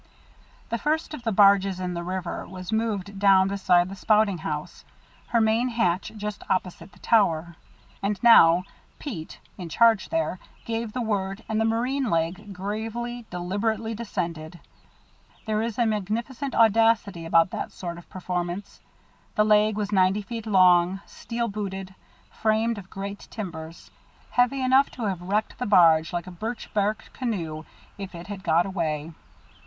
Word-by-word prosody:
The 235 Hz, -, -2 dB
first 310 Hz, +4 st, -1 dB
of 300 Hz, -, -6 dB
the 230 Hz, -1 st, -1 dB
barges 195 Hz, -2 st, +4 dB
in 180 Hz, -1 st, -3 dB
the 170 Hz, -, -3 dB
river 180 Hz, 0 st, -4 dB
was 185 Hz, +1 st, -8 dB
moved 205 Hz, -3 st, -2 dB
down 195 Hz, -1 st, +5 dB
beside 180 Hz, -3 st, +3 dB
the 195 Hz, -, -7 dB
spouting 210 Hz, -2 st, +2 dB
house, 150 Hz, -1 st, -5 dB, 0.4 s
her 235 Hz, -, +2 dB
main 225 Hz, +3 st, +2 dB
hatch 190 Hz, -6 st, 0 dB
just 210 Hz, 0 st, -5 dB
opposite 185 Hz, +1 st, -2 dB
the -, -, -20 dB
tower. 170 Hz, -6 st, +2 dB, 0.5 s
And 200 Hz, +1 st, -1 dB
now 175 Hz, -7 st, +7 dB, 0.3 s
Pete, 185 Hz, -, -7 dB, 0.2 s
in 175 Hz, -2 st, -6 dB
charge 225 Hz, +3 st, +3 dB
there, 325 Hz, -, -1 dB, 0.3 s
gave 230 Hz, -1 st, -3 dB
the 250 Hz, -, -2 dB
word, 200 Hz, -1 st, -2 dB
and 220 Hz, 0 st, 0 dB
the -, -, +2 dB
marine 245 Hz, +3 st, 0 dB
leg, 170 Hz, +5 st, -1 dB
gravely, 225 Hz, +5 st, -5 dB
deliberately 205 Hz, +6 st, -2 dB
descended. 175 Hz, -7 st, -5 dB, 0.9 s
There 215 Hz, -1 st, 0 dB
is 230 Hz, -1 st, -3 dB
a 240 Hz, -, +3 dB
magnificent 230 Hz, +6 st, -2 dB
audacity 225 Hz, -5 st, +3 dB
about 165 Hz, +1 st, +3 dB
that -, -, -4 dB
sort 170 Hz, -2 st, -6 dB
of 175 Hz, -, -17 dB
performance. 180 Hz, +1 st, -4 dB, 0.6 s
The 210 Hz, -, +3 dB
leg 210 Hz, 0 st, +4 dB
was 205 Hz, -1 st, -2 dB
ninety 190 Hz, +1 st, +3 dB
feet 225 Hz, +1 st, -6 dB
long, 185 Hz, -1 st, +4 dB
steel 235 Hz, 0 st, -4 dB
booted, 195 Hz, -3 st, -5 dB, 0.4 s
framed 220 Hz, 0 st, 0 dB
of 190 Hz, -1 st, -13 dB
great 200 Hz, +1 st, -7 dB
timbers, 165 Hz, -5 st, -8 dB, 0.4 s
heavy 250 Hz, +2 st, +2 dB
enough 265 Hz, +2 st, +4 dB
to 240 Hz, -, -4 dB
have 190 Hz, -4 st, -2 dB
wrecked 205 Hz, +4 st, -2 dB
the 250 Hz, -, -2 dB
barge 165 Hz, -5 st, +5 dB
like 175 Hz, 0 st, -3 dB
a 185 Hz, -, -9 dB
birch 220 Hz, +7 st, -6 dB
bark 210 Hz, +1 st, -1 dB
canoe 165 Hz, -11 st, -4 dB, 0.3 s
if 195 Hz, -2 st, -7 dB
it 170 Hz, +1 st, -8 dB
had 200 Hz, -2 st, -7 dB
got 165 Hz, +2 st, +3 dB
away. 165 Hz, -5 st, -2 dB
200 Hz, 155 wpm, -25 LUFS, 180-225 Hz, 0.9 s, now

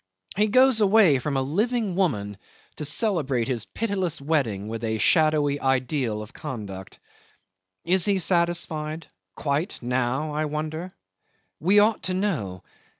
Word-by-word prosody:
He 210 Hz, +3 st, +3 dB
goes 255 Hz, +1 st, +4 dB
away 195 Hz, -9 st, +5 dB
from 140 Hz, +2 st, -2 dB
a 135 Hz, -, +1 dB
living 210 Hz, -, 0 dB
woman 105 Hz, -, -1 dB, 0.4 s
to 150 Hz, -, -4 dB
celebrate 145 Hz, -, 0 dB
his 120 Hz, -5 st, -2 dB
pitiless 190 Hz, -8 st, -2 dB
wedding 135 Hz, -9 st, -1 dB
with 115 Hz, +1 st, -5 dB
a 110 Hz, -1 st, -1 dB
shadowy 150 Hz, -, +3 dB
ideal 130 Hz, -4 st, 0 dB
of 105 Hz, -, -13 dB
conduct. 100 Hz, -6 st, -7 dB, 0.9 s
Is 180 Hz, +1 st, +3 dB
he 200 Hz, -2 st, +3 dB
satisfied 170 Hz, -3 st, 0 dB, 0.3 s
quite, 145 Hz, +4 st, -1 dB
now, 130 Hz, +5 st, -1 dB
I 155 Hz, +1 st, -1 dB
wonder? 155 Hz, +4 st, -4 dB, 0.7 s
We 190 Hz, +6 st, +3 dB
ought 210 Hz, +1 st, +4 dB
to 185 Hz, -, -1 dB
know. 145 Hz, -, -2 dB
155 Hz, 135 wpm, -25 LUFS, 125-185 Hz, 0.9 s, away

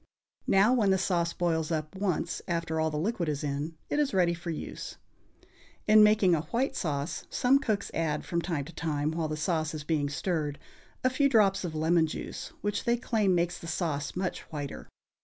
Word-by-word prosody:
Now, 200 Hz, +5 st, +5 dB
when 220 Hz, -6 st, +3 dB
the 190 Hz, -, +4 dB
sauce 175 Hz, -3 st, +1 dB
boils 165 Hz, -3 st, 0 dB
up 155 Hz, +1 st, -2 dB
once 185 Hz, -4 st, -1 dB
after 165 Hz, -2 st, -1 dB
all 160 Hz, 0 st, +2 dB
the 150 Hz, -, -3 dB
liquid 175 Hz, 0 st, -1 dB
is 145 Hz, -1 st, -2 dB
in, 145 Hz, +3 st, -3 dB
it 295 Hz, -, 0 dB
is 285 Hz, -8 st, +1 dB
ready 175 Hz, -2 st, +3 dB
for 175 Hz, 0 st, -6 dB
use. 160 Hz, -, -6 dB, 0.9 s
In 215 Hz, 0 st, +8 dB
making 210 Hz, -3 st, +5 dB
a 160 Hz, -, +2 dB
white 240 Hz, -, -1 dB
sauce 145 Hz, 0 st, -2 dB
some 270 Hz, +2 st, +3 dB
cooks 215 Hz, -8 st, -1 dB
add, 155 Hz, -2 st, -1 dB
from 170 Hz, -1 st, -1 dB
time 160 Hz, -5 st, -2 dB
to 165 Hz, -, -11 dB
time 150 Hz, -2 st, -1 dB
while 160 Hz, -1 st, -1 dB
the 155 Hz, 0 st, -3 dB
sauce 160 Hz, 0 st, -1 dB
is 150 Hz, -, -5 dB
being 150 Hz, -2 st, 0 dB
stirred, 150 Hz, -2 st, -2 dB, 0.5 s
a 255 Hz, -, +4 dB
few 280 Hz, +2 st, +3 dB
drops 205 Hz, -6 st, +4 dB
of 165 Hz, -3 st, -4 dB
lemon 160 Hz, +1 st, +3 dB
juice, -, -, -6 dB
which 205 Hz, 0 st, -2 dB
they 235 Hz, 0 st, +3 dB
claim 215 Hz, -6 st, +1 dB
makes 170 Hz, 0 st, 0 dB
the 165 Hz, -, -9 dB
sauce 150 Hz, -4 st, -2 dB
much 185 Hz, 0 st, -2 dB
whiter. 145 Hz, -3 st, -6 dB
170 Hz, 195 wpm, -29 LUFS, 155-195 Hz, 0.9 s, In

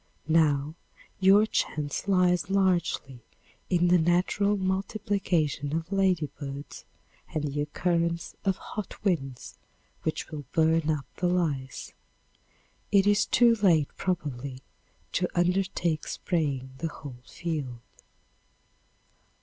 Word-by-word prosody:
Now 155 Hz, -2 st, +3 dB, 0.5 s
your 195 Hz, +2 st, +6 dB
chance 150 Hz, -5 st, -2 dB
lies 180 Hz, -2 st, +3 dB
largely 180 Hz, -9 st, +1 dB, 0.5 s
in 175 Hz, -1 st, +3 dB
the 180 Hz, 0 st, +5 dB
natural 180 Hz, +5 st, +2 dB
multiplication 190 Hz, -6 st, -1 dB
of 165 Hz, +3 st, -6 dB
ladybirds 155 Hz, -7 st, -1 dB, 0.5 s
and 155 Hz, -, 0 dB
the 145 Hz, 0 st, -2 dB
occurrence 170 Hz, +2 st, -1 dB
of 195 Hz, -2 st, +1 dB
hot 210 Hz, -1 st, -7 dB
winds 135 Hz, -, -2 dB, 0.4 s
which 160 Hz, -, -3 dB
will 150 Hz, -2 st, -6 dB
burn 160 Hz, -1 st, +3 dB
up 150 Hz, -4 st, 0 dB
the 180 Hz, -, +1 dB
lice. 155 Hz, -7 st, -1 dB, 1.0 s
It 200 Hz, -1 st, +5 dB
is 205 Hz, 0 st, +3 dB
too 235 Hz, -1 st, +5 dB
late 165 Hz, -8 st, +4 dB
probably, 140 Hz, -7 st, -3 dB, 0.5 s
to 180 Hz, -, +1 dB
undertake 175 Hz, -3 st, +1 dB
spraying 140 Hz, -7 st, -2 dB
the 165 Hz, -, -1 dB
whole 130 Hz, -5 st, -10 dB
field. 140 Hz, -7 st, -4 dB
170 Hz, 105 wpm, -28 LUFS, 145-185 Hz, 1.0 s, your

